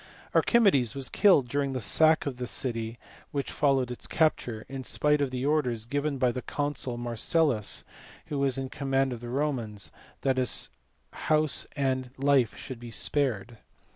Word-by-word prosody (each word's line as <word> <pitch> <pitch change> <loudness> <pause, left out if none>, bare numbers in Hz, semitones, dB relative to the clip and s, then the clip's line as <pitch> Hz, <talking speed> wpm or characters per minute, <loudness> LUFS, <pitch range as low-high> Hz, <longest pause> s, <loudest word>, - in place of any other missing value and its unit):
Archimedes 145 - +3
was 135 -2 -2
killed 180 - +4
during 140 +1 -1
the 130 - -2
sack 160 +7 +4
of 135 -4 -4
the 125 -1 -4
city 115 -3 -2 0.3
which 140 -1 -3
followed 135 -4 +1
its 125 - -5
capture, 125 -8 0
in 135 -1 -6
spite 150 +2 +1
of 140 - +1
the 130 +1 -3
orders, 125 -7 0
given 145 +3 -2
by 125 -2 +2
the 125 - -5
consul 145 -4 -3
Marcellus 120 +1 +1 0.4
who 150 -3 -4
was 135 -2 +1
in 135 0 -3
command 135 -1 -1
of 120 - -7
the 120 - -7
Romans, 120 -7 -2 0.3
that 135 -1 +1
his 130 -1 +1 0.4
house 155 -3 +2
and 130 -3 -1
life 135 -3 +2
should 130 -3 -8
be 120 0 -9
spared. 115 -3 -1
135 Hz, 165 wpm, -28 LUFS, 120-145 Hz, 0.4 s, killed